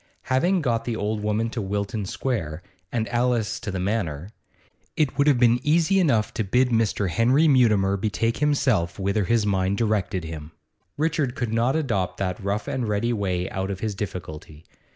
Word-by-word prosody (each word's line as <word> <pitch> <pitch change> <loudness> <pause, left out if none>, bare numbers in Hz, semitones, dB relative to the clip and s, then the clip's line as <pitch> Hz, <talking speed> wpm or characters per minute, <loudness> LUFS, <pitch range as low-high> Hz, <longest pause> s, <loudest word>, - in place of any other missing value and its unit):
Having 175 +6 +2
got 115 -4 0
the 120 - -2
old 105 0 -2
woman 105 +2 -1
to 115 - -3
Wilton 100 +1 -3
Square, 90 - -3 0.3
and 115 -2 -1
Alice 120 -3 0
to - - -6
the 95 -2 -3
Manor, 90 -4 -2 0.7
it 150 -4 +1
would 140 +1 +2
have 145 -4 +5
been 120 0 +4
easy 170 +6 +3
enough 120 - +2
to 110 - -1
bid 125 +6 +2
Mr. 110 -4 +1
Henry 130 - +3
Mutimer 105 -8 +3
betake 110 +3 -1
himself 130 - +1
whither 100 +1 0
his 115 +1 +2
mind 95 -1 +1
directed 100 -5 0
him. 80 -1 -8 0.4
Richard 150 -4 0
could 120 -3 -2
not 120 +5 +2
adopt 100 - -1
that 95 +1 -3
rough 100 +2 -2
and 125 -4 -2
ready 105 +3 0
way 95 -4 -1
out 95 +1 -3
of 95 -1 -5
his 110 -2 -2
difficulty. 80 -5 -7
110 Hz, 175 wpm, -24 LUFS, 95-125 Hz, 0.7 s, have